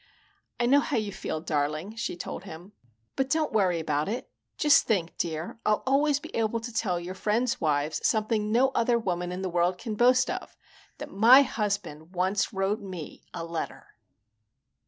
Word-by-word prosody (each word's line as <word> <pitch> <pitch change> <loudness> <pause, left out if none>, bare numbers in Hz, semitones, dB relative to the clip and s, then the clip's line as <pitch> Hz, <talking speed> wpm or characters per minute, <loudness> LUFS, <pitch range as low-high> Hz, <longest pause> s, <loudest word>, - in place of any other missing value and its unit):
"I 240 - +2
know 275 +4 +5
how 285 - -1
you 215 -2 -2
feel, 155 -4 -4
darling," 155 +6 -2
she 230 -6 -4
told - - -6
him. 175 +2 -10 0.4
"But 270 0 0
don't 310 -3 0
worry 185 -5 +2
about 150 +1 -1
it. 235 +4 -4 0.3
Just 295 -1 +5
think, 185 -7 0
dear, 165 +5 -4
I'll 210 0 +1
always 280 +2 +3
be - - -10
able 225 0 0
to 235 +1 -7
tell 180 -5 0
your 175 +2 -6
friends' 225 +5 0
wives 150 -1 0
something 215 -1 +1
no 255 +4 +4
other 240 -2 +2
woman 180 -5 -2
in 185 +1 -4
the - - -1
world 175 +1 +1
can 220 +3 -5
boast 250 +3 +4
of: - - -7 0.4
that - - -8
my 240 +7 +7
husband 200 - -3
once 190 +4 +1
wrote 200 +2 -1
me 185 -6 -8
a 165 - -5
letter!" 165 -1 -5
200 Hz, 180 wpm, -27 LUFS, 175-235 Hz, 0.4 s, my